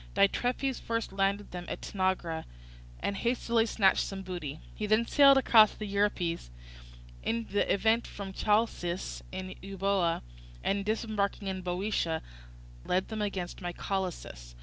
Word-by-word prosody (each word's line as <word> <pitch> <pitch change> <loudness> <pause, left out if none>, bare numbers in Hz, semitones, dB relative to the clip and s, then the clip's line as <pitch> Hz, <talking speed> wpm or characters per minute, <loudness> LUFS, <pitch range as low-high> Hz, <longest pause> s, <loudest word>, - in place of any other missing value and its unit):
Diitrephes 245 +6 +2
first 230 -3 -2
landed 200 +1 0
them 180 -1 -6
at - - -5
Tanagra 185 -4 -1 0.6
and 200 - -1
hastily 235 -1 +1
snatched 195 -3 +3
some 195 -1 -5
booty; 165 -6 -5
he 210 - -3
then 215 +2 +3
sailed 275 +2 +7
across 225 -5 +6
the 215 - -5
Euripus 200 - 0 0.7
in 230 0 -1
the 205 - +2
evening 220 +4 +3
from 195 -4 -7
Chalcis 205 -4 0
in 185 0 -5
Euboea 195 -3 0 0.4
and 200 0 +1
disembarking 215 -2 -1
in 190 -1 -3
Boeotia 180 -2 -1 0.6
led 185 +1 0
them 220 -1 -3
against 190 -4 -3
Mycalessus. 175 - -4
195 Hz, 130 wpm, -30 LUFS, 185-215 Hz, 0.7 s, sailed